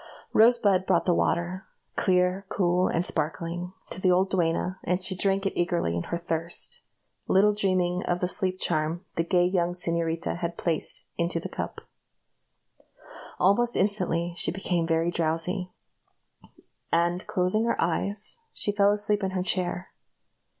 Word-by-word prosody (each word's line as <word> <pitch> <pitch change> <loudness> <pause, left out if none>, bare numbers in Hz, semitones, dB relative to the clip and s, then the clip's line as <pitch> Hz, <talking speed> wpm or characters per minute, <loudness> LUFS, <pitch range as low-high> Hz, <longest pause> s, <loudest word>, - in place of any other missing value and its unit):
Rosebud 215 -5 +4
brought 170 -3 +2
the 180 - +3
water 175 +2 -1 0.3
clear, 180 +1 +1
cool, 180 -1 +1
and 170 +2 0
sparkling 165 +3 -3 0.2
to 185 - -4
the 185 - +3
old 185 +2 +2
duenna, 180 +1 0
and 180 +1 0
she 185 0 +4
drank 195 +2 +2
it 195 - -1
eagerly 175 - 0
in 85 - -3
her 170 - -3
thirst, 170 0 -1 0.5
little 205 +2 +4
dreaming 185 -3 0
of 175 0 0
the 180 - 0
sleep 185 0 -2
charm 165 +1 -1
the 165 - +1
gay 175 +1 +2
young 175 -1 0
señorita 170 -1 0
had 170 -1 -3
dropped 165 -3 -1 0.2
into 170 0 +1
the - - -6
cup. - - -5 1.6
Almost 235 +6 +2
instantly 180 -4 0
she - - +2
became 175 -2 -1
very 165 +1 +1
drowsy, 170 +3 -1 1.2
and, 175 +2 +1
closing 185 +5 +1
her 235 - 0
eyes, 200 - -1
she 205 - 0
fell 200 0 +3
asleep 210 0 +1
in 190 - -1
her 185 -1 -2
chair. 180 0 -2
180 Hz, 150 wpm, -26 LUFS, 170-190 Hz, 1.6 s, Rosebud